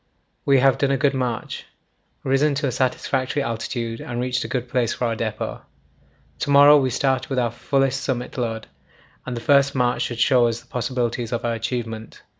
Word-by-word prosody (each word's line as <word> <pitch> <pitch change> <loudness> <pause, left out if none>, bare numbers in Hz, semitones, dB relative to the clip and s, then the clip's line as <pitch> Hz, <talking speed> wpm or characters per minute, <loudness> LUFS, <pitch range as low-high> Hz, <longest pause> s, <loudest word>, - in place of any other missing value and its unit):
We 140 -1 +5
have 135 -1 +4
done 140 - +2
a 135 - +2
good 140 +1 +2
march, 125 -3 -3 0.6
risen 140 +2 +2
to 145 +2 -1
a 135 - 0
satisfactory 130 +2 -1
altitude, 115 0 -4
and 120 0 -5
reached 125 0 -1
a - - -5
good 125 -1 -3
place 120 -2 0
for 125 - -2
our 115 -1 0
depot. 110 - -4 0.8
To - - -2
morrow 145 +1 +8
we 130 -2 +1
start 130 0 0
with 135 - -2
our 120 -2 +1
fullest 135 +2 0
summit 125 -2 -3
load, 115 -3 -3 0.6
and 125 - -3
the - - -5
first 140 +2 +3
march 125 -1 +1
should 120 - -2
show 120 0 +4
us 115 0 -2
the - - -20
possibilities 120 -1 -2
of 120 -1 -2
our 120 - 0
achievement. 115 -1 -5
125 Hz, 195 wpm, -22 LUFS, 115-135 Hz, 0.8 s, morrow